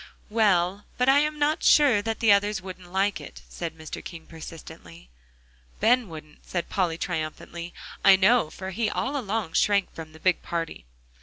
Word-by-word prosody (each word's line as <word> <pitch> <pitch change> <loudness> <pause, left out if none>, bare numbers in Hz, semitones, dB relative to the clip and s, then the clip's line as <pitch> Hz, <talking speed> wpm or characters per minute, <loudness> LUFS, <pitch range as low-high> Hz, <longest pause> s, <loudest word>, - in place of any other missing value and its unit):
"Well, 200 -3 +2
but 250 - +1
I 270 +1 +6
am 300 +1 0
not 295 +1 +1
sure 270 -9 +5
that 225 +1 -3
the 225 -2 +5
others 205 +1 +3
wouldn't 185 -1 -10
like 195 +2 0
it," - - -11
said 165 -2 -6
Mr. 155 0 -8
King 165 -3 -9
persistently. 155 - -12 0.7
"Ben 245 -2 +3
wouldn't," 155 -2 -11
said 175 -2 -4
Polly 175 -4 0
triumphantly, 170 +2 -5 0.3
"I 195 - +8
know, 190 -2 +4
for 190 +3 -7
he 215 +3 -1
all 275 +6 -2
along 215 - -2
shrank 200 -2 +2
from 160 -1 -9
the 160 - -14
big 185 +1 +1
party." 165 - -5
190 Hz, 170 wpm, -26 LUFS, 165-220 Hz, 0.7 s, I